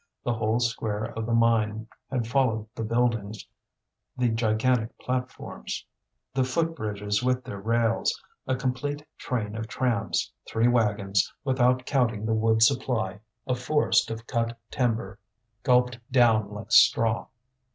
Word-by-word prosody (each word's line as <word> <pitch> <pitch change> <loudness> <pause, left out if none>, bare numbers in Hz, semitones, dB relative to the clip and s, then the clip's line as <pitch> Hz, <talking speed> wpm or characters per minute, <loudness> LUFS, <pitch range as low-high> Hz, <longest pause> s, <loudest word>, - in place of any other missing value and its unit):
The 120 - 0
whole 110 +1 0
square 110 -3 -1
of 110 0 -3
the 120 - 0
mine 110 -1 +2 0.2
had 125 -3 -1
followed 115 -3 +1
the 115 - -4
buildings, 110 -2 -1 0.7
the 125 -1 +2
gigantic 115 +1 +1
platforms, 125 - -4 0.5
the 130 0 +2
foot 165 +6 0
bridges 105 -3 -2
with 125 0 +1
their 100 - -7
rails, 115 +1 +1 0.3
a 130 - +1
complete 145 +3 -3
train 110 -4 -3
of 110 0 -4
trams, 115 -2 -1 0.2
three 115 +2 +2
wagons; 105 -5 +2
without 125 -2 +2
counting 120 -7 +1
the 110 - +1
wood 110 0 +3
supply, 110 -5 +1 0.3
a 125 - 0
forest 125 -2 +2
of 115 0 -6
cut 115 -1 -1
timber, 110 -5 -1 0.4
gulped 125 -2 +3
down 115 -5 +4
like 105 +2 -8
straw. 115 0 +5
115 Hz, 135 wpm, -26 LUFS, 110-125 Hz, 0.7 s, straw